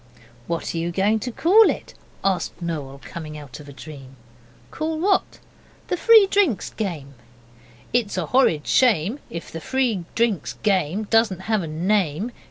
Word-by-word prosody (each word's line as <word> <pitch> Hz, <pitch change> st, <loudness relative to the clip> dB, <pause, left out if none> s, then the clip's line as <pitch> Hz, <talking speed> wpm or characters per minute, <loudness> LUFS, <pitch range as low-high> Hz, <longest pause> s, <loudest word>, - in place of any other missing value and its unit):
'What 170 Hz, -1 st, -3 dB
are 165 Hz, -, -2 dB
you 170 Hz, +1 st, -2 dB
going 200 Hz, +5 st, +1 dB
to 245 Hz, +3 st, -4 dB
call 400 Hz, -, +5 dB
it?' -, -, -4 dB, 0.3 s
asked 195 Hz, -2 st, -1 dB
Noel, 150 Hz, -6 st, -5 dB
coming 155 Hz, -2 st, -7 dB
out 145 Hz, -2 st, -10 dB
of 145 Hz, -1 st, -12 dB
a -, -, -9 dB
dream. 135 Hz, -2 st, -11 dB, 0.6 s
'Call 315 Hz, 0 st, -3 dB
what?' 385 Hz, +3 st, +1 dB, 0.5 s
'The 360 Hz, -, 0 dB
Free 445 Hz, +1 st, +7 dB
Drinks 350 Hz, -, +1 dB
game.' 165 Hz, -10 st, -5 dB, 0.8 s
'It's 230 Hz, -5 st, 0 dB
a 180 Hz, -, -1 dB
horrid 165 Hz, -, +2 dB
shame 230 Hz, -, +2 dB
If 165 Hz, -, -7 dB
the 165 Hz, -, -6 dB
Free 240 Hz, -8 st, 0 dB
Drinks 225 Hz, -9 st, 0 dB
game 195 Hz, -1 st, +1 dB
Doesn't 215 Hz, -3 st, +2 dB
have 215 Hz, +1 st, 0 dB
a 165 Hz, -, -5 dB
name. 180 Hz, +4 st, 0 dB
195 Hz, 160 wpm, -23 LUFS, 160-235 Hz, 0.8 s, Free